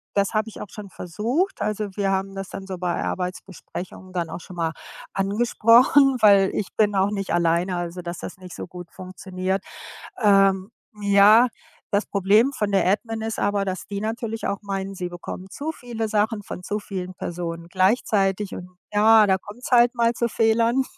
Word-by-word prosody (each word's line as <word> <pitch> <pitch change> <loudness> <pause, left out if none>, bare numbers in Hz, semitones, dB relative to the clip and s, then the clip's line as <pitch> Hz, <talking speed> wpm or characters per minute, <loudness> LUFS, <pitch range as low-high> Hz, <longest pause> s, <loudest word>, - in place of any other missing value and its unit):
das 200 +2 +1
habe 215 +1 +1
ich - - -10
auch 205 - -7
schon 205 +1 -9
versucht. 230 - -2
Also 210 0 -2
wir 195 -2 0
haben 195 0 -2
das 195 -1 -6
dann 190 - -8
so 185 -2 -5
bei 175 -1 -2
Arbeitsbesprechungen 185 0 -6
dann 170 -2 -2
auch 175 - -6
schon 180 - -11
mal 165 -1 -1 0.4
angesprochen, 235 +6 +4
weil 200 -2 +6
ich 205 - -2
bin 210 -1 +2
auch 195 +1 +2
nicht 195 -3 -3
alleine, 175 +1 +1
also 175 +1 -4
dass 175 0 -6
das - - -7
nicht 180 -1 -11
so - - -7
gut 175 -1 -10
funktioniert. 185 +1 -4 0.6
Ähm, 195 -2 +4 0.3
ja, 205 +4 +6 0.4
das 200 0 +1
Problem 210 +7 +3
von 210 -6 -2
der 195 -2 +3
Admin 225 +2 -1
ist 220 0 -4
aber, 205 -1 +1
dass 185 -1 -4
die 200 -1 -4
natürlich 225 +1 -3
auch 200 +1 -3
meinen, 195 -1 -4
sie 180 -2 -4
bekommen 180 +1 -8
zu 295 +9 -4
viele 235 -6 -5
Sachen 210 0 0
von 180 - -8
zu 205 +3 -2
vielen 185 -2 -6
Personen 170 -1 -5
gleichzeitig. 195 0 +1
Und 180 0 -8 0.2
ja, 215 +1 +6
da 190 -1 +3
kommt's 220 +8 -10
halt 240 0 +5
mal 235 0 +2
zu 235 0 0
Fehlern 230 +4 +2
200 Hz, 185 wpm, -23 LUFS, 185-220 Hz, 0.6 s, weil